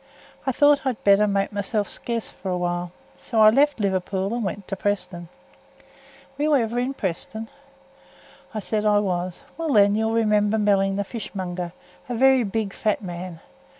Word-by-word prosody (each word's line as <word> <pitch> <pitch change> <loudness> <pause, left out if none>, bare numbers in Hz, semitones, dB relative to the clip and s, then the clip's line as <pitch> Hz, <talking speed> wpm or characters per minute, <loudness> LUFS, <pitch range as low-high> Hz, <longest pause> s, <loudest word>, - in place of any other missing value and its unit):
I - - +3
thowt 290 +2 +4
I'd 260 -4 -2
better 200 +1 +5
make 200 0 0
mysel' 205 +1 -1
scarce 230 +3 -4
for 190 - -7
a 180 - 0
while, 175 0 -2 0.3
so 230 - -2
I 215 0 +8
left 285 +2 +3
Liverpool 195 0 -1
and 240 -1 -2
went 195 0 -4
to 195 - -2
Preston. 180 -4 -3 1.1
Were - - 0
you 305 -1 +4
ever 235 -2 +1
in 260 +2 -2
Preston?" 220 +4 -4 1.0
I 215 - -4
said 210 +2 0
I 210 -1 +4
was. 180 0 -2 0.2
"Well 325 -2 -1
then, 200 -2 +5
you'll 220 +1 0
remember 210 -1 +2
Melling, 195 -2 +2
the 200 - 0
fish 220 +1 -8
monger, 180 -2 -4 0.4
a 245 - -2
varra 260 0 +4
big, 205 0 -2
fat 215 -1 -1
man. 175 -2 -7
205 Hz, 175 wpm, -24 LUFS, 190-230 Hz, 1.1 s, I